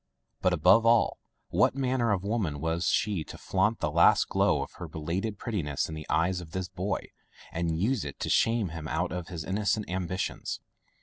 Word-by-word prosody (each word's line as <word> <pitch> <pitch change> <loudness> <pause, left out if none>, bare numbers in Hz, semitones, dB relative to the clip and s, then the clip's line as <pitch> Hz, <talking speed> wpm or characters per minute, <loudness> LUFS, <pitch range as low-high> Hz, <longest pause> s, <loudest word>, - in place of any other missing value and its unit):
But, 90 - +3
above 90 +7 +5
all, 115 0 +3 0.3
what - - +3
manner 130 -4 +1
of 95 -2 0
woman 100 -9 -1
was 80 +3 -1
she 100 -6 +1
to - - -9
flaunt 105 +4 0
the 75 - 0
last 85 +2 +5
glow - - +2
of - - -10
her 85 - -6
belated 85 +7 -3
prettiness 85 - -2
in 80 - -7
the 80 -1 -7
eyes 85 +3 +1
of 80 -2 -12
this 95 -1 -2
boy - - -3 0.4
and 80 -1 -1
use 115 +4 +1
it 70 - -7
to - - -1
shame 115 -4 +3
him 80 -1 -6
out 90 +2 -1
of 90 -1 -4
his 85 -3 -5
innocent 105 +2 0
ambitions! 95 0 -3
90 Hz, 190 wpm, -29 LUFS, 80-105 Hz, 0.4 s, above